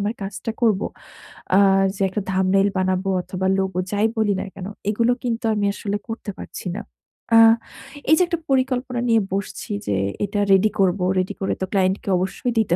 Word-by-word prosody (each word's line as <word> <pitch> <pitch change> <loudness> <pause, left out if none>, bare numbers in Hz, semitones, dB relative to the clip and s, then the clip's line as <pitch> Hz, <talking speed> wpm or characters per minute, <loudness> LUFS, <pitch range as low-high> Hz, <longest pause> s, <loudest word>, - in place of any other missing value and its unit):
আমার 205 +3 -1
কাজটা 195 +2 -5
করবো 210 -4 +3 0.7
আ - - +7 0.4
যে 195 - -7
একটা 205 +2 -3
thumbnail 190 +1 +3
বানাবো 185 +1 0
অথবা, 190 +1 -4
লোগো 190 -1 -2
যাই 210 +1 +2
বলি 215 -2 +2
না - - -4
কেন? 185 -1 -6 0.2
এগুলো 230 +3 +2
কিন্তু 235 -1 -2
আমি 205 -1 0
আসলে 205 0 -3
করতে 225 -2 -5
পারছি - - -8
না। 215 - -4 0.5
আ - - +9 0.7
এইযে 315 +3 +5
একটা 340 -1 -2
পরিকল্পনা 255 -2 0
নিয়ে 225 -1 +4
বসছি 200 +3 -4 0.2
যে, 100 - +1 0.3
"এটা 205 +1 -3
রেডি 195 +2 +5
করবো। 185 -1 +2 0.2
রেডি 185 - -1
করে 195 - 0
তো 190 - +1
ক্লায়েন্টকে 190 0 +1
অবশ্যই 190 +7 -2
দিতে 170 -6 +2
200 Hz, 175 wpm, -22 LUFS, 190-225 Hz, 0.7 s, আ